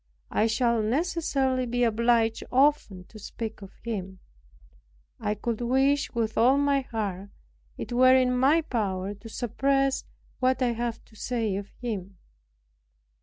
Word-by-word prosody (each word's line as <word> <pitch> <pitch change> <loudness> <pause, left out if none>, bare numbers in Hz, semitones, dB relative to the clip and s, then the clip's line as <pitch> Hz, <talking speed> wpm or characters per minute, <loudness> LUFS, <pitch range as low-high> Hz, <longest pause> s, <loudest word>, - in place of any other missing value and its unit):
I 220 - +2
shall 235 0 +1
necessarily 265 0 0
be 245 +1 0
obliged 230 0 +2
often 260 -9 +2
to 215 +4 -14
speak 220 +1 -6
of 195 - -12
him. 195 -5 -4 1.0
I 210 -1 -1
could 230 +2 -3
wish 270 +4 +2
with 225 -2 -1
all 255 +4 +5
my 285 -1 +2
heart 205 -6 -4 0.5
it - - -5
were 255 +1 +6
in 255 -1 +3
my 275 +6 +4
power 200 -8 -2
to 205 +3 -12
suppress 270 +4 0 0.4
what 255 0 +2
I 245 - +2
have 235 0 -4
to 220 - -21
say 225 -2 -2
of 200 +1 -5
him. 200 -6 -5
235 Hz, 140 wpm, -27 LUFS, 215-260 Hz, 1.0 s, were